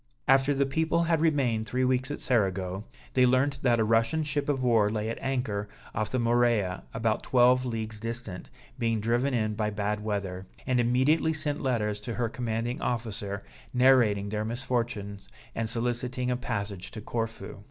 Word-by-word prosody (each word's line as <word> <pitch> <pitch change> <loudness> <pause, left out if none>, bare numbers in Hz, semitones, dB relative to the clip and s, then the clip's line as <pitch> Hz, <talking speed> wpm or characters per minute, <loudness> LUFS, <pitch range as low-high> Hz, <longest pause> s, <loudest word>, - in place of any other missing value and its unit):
After 135 +1 +4
the 140 0 +2
people 160 +4 +1
had 165 -2 +1
remained 130 -9 +1
three 130 +1 0
weeks 130 +1 +1
at 145 - -5
Cerigo, 95 -4 0 0.3
they 130 -1 +5
learnt 135 +2 +2
that 120 -3 +3
a - - +4
Russian 115 +8 +2
ship 145 0 -1
of 135 -3 0
war 115 -4 +4
lay 110 0 -2
at 115 - -4
anchor 115 -6 -2 0.2
off 110 -1 -1
the 130 - -1
Morea 115 -6 +2
about 115 -1 0
twelve 125 0 +4
leagues 110 -3 -4
distant, 115 -4 -4 0.3
being 115 -2 +1
driven 120 +5 +1
in 110 -2 0
by 105 0 -1
bad 105 0 -2
weather, 95 -3 -3 0.2
and 125 -1 +1
immediately 130 +7 +3
sent 150 -1 0
letters 105 -6 0
to 110 +2 -5
her 120 -2 0
commanding 120 0 -3
officer, 105 -4 -3 0.3
narrating 120 -6 +4
their 105 0 -2
misfortunes 115 -4 -2 0.3
and 115 -1 -2
soliciting 125 +2 -1
a - - +1
passage 100 -6 -4
to 110 - -8
Corfu. 110 -3 -4
115 Hz, 170 wpm, -28 LUFS, 105-130 Hz, 0.3 s, they